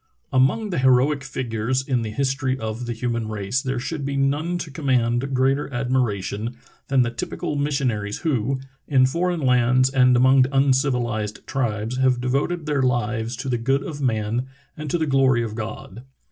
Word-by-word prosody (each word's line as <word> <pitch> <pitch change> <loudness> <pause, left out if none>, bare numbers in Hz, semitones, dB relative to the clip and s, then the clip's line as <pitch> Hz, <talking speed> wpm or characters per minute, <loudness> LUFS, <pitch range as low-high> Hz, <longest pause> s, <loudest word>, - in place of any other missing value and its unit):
A 130 - +4
MONG 200 +11 +2
the 175 - -1
heroic 130 +2 +3
figures 125 +1 -2
in 130 -4 +1
the 110 - -3
history 130 +2 -1
of 110 +1 -5
the 120 - -2
y\ - - -13
human 115 -2 -2
race 110 +4 -2
there 130 0 -2
should 145 +4 -4
be 140 0 -2
none 145 +6 0
to 165 -4 -6
connmand 130 -2 0
greater 135 +3 +1
admiration 120 -3 -1 0.3
than 135 -2 +3
the 120 - -2
typical 120 +5 -4
missiona 140 -6 0
ries 105 0 -4
who, 130 -3 0 0.3
in 130 -3 +4
foreign 170 +5 0
lands 130 0 +3
and 125 -2 +4
among 130 +1 +5
uncivilized 125 -6 0
tribes, 115 -2 -2
have 130 -1 +2
devoted 140 +7 -1
their 145 -3 0
lives 120 -2 0
to 135 - -6
the 120 -2 0
good 135 +4 +1
of 145 -1 -6
man 115 0 -1 0.3
and 155 -1 -6
to 175 - +1
the 160 - 0
glory 135 -4 +3
of 110 -2 -4
God. 110 0 -7
130 Hz, 180 wpm, -23 LUFS, 120-135 Hz, 0.3 s, among